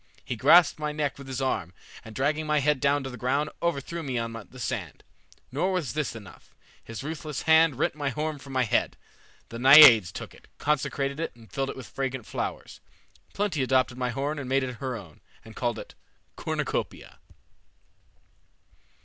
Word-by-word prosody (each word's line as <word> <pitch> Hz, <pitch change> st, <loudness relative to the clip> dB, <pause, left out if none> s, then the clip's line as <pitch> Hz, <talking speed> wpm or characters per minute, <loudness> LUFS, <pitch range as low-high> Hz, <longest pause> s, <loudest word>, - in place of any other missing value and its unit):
He 125 Hz, -, -3 dB
grasped 155 Hz, +8 st, +5 dB
my 150 Hz, 0 st, -2 dB
neck 150 Hz, -2 st, -2 dB
with 140 Hz, -, -10 dB
his 130 Hz, 0 st, -3 dB
arm, 90 Hz, -9 st, -2 dB, 0.3 s
and 110 Hz, -1 st, -11 dB
dragging 150 Hz, +3 st, 0 dB
my 150 Hz, 0 st, +2 dB
head 145 Hz, 0 st, +2 dB
down 140 Hz, +1 st, +2 dB
to 135 Hz, -, -5 dB
the 125 Hz, -, -8 dB
ground, 140 Hz, +4 st, 0 dB
overthrew 170 Hz, 0 st, -2 dB
me 130 Hz, -5 st, -3 dB
on 115 Hz, 0 st, -2 dB
the 115 Hz, +3 st, -10 dB
sand. -, -, -4 dB, 0.5 s
Nor 165 Hz, +9 st, 0 dB
was 180 Hz, -7 st, -2 dB
this 150 Hz, -5 st, -2 dB
enough. 105 Hz, -5 st, -13 dB, 0.3 s
His 115 Hz, +2 st, -8 dB
ruthless 155 Hz, -1 st, -5 dB
hand 160 Hz, -2 st, +5 dB
rent 130 Hz, -, 0 dB
my 145 Hz, -2 st, -2 dB
horn 150 Hz, +2 st, -3 dB
from 135 Hz, 0 st, -11 dB
my 130 Hz, -1 st, +2 dB
head. 115 Hz, -, 0 dB, 0.5 s
The 115 Hz, -, -7 dB
Naiades 130 Hz, -, +9 dB
took -, -, -8 dB
it, -, -, -19 dB
consecrated 140 Hz, -1 st, -1 dB
it, 165 Hz, -, -4 dB
and 115 Hz, -5 st, -18 dB
filled 135 Hz, +4 st, -2 dB
it -, -, -6 dB
with 130 Hz, -, -8 dB
fragrant 130 Hz, -3 st, -4 dB
flowers. -, -, -5 dB, 0.6 s
Plenty 200 Hz, -8 st, -1 dB
adopted 130 Hz, -1 st, +2 dB
my 125 Hz, -1 st, 0 dB
horn 140 Hz, +5 st, -2 dB
and 130 Hz, -3 st, -6 dB
made 135 Hz, 0 st, +2 dB
it 125 Hz, -1 st, -4 dB
her 130 Hz, -1 st, -4 dB
own, 90 Hz, -9 st, -11 dB, 0.2 s
and 110 Hz, -1 st, -13 dB
called 120 Hz, -2 st, -1 dB
it -, -, -9 dB, 0.4 s
'Cornucopia.'" -, -, -4 dB
135 Hz, 185 wpm, -27 LUFS, 125-150 Hz, 0.6 s, Naiades